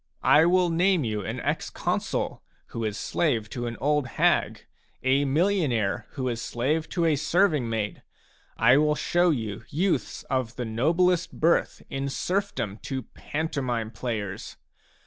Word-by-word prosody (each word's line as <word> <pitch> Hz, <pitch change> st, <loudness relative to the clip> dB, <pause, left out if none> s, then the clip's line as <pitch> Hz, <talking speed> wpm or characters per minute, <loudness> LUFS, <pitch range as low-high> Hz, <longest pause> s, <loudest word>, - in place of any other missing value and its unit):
I 155 Hz, +2 st, +6 dB
will 180 Hz, -1 st, +3 dB
name 180 Hz, 0 st, +3 dB
you 105 Hz, -3 st, -2 dB
an -, -, -4 dB
ex -, -, -1 dB
consul -, -, -2 dB, 0.3 s
who 115 Hz, -, -4 dB
is 105 Hz, -1 st, -2 dB
slave 115 Hz, -10 st, 0 dB
to 120 Hz, -1 st, -3 dB
an 115 Hz, -, -5 dB
old 150 Hz, -1 st, +1 dB
hag, -, -, +2 dB, 0.4 s
a 135 Hz, +2 st, +3 dB
millionaire 145 Hz, -, +1 dB
who 130 Hz, -2 st, -3 dB
is 115 Hz, -2 st, -2 dB
slave 150 Hz, +9 st, -1 dB
to 170 Hz, -2 st, 0 dB
a 160 Hz, -2 st, +3 dB
serving 155 Hz, -3 st, +2 dB
maid; 110 Hz, -2 st, -2 dB, 0.6 s
I 120 Hz, +4 st, +6 dB
will 150 Hz, 0 st, +3 dB
show 175 Hz, +3 st, +2 dB
you 110 Hz, -, -2 dB
youths 175 Hz, +5 st, -1 dB
of 130 Hz, -3 st, -2 dB
the 125 Hz, -, -3 dB
noblest 165 Hz, +10 st, +1 dB
birth 165 Hz, +2 st, +2 dB
in 135 Hz, +1 st, -3 dB
serfdom 135 Hz, -, -2 dB
to 130 Hz, -2 st, -4 dB
pantomime 130 Hz, -8 st, -3 dB
players 110 Hz, -4 st, -5 dB
135 Hz, 145 wpm, -26 LUFS, 115-165 Hz, 0.6 s, I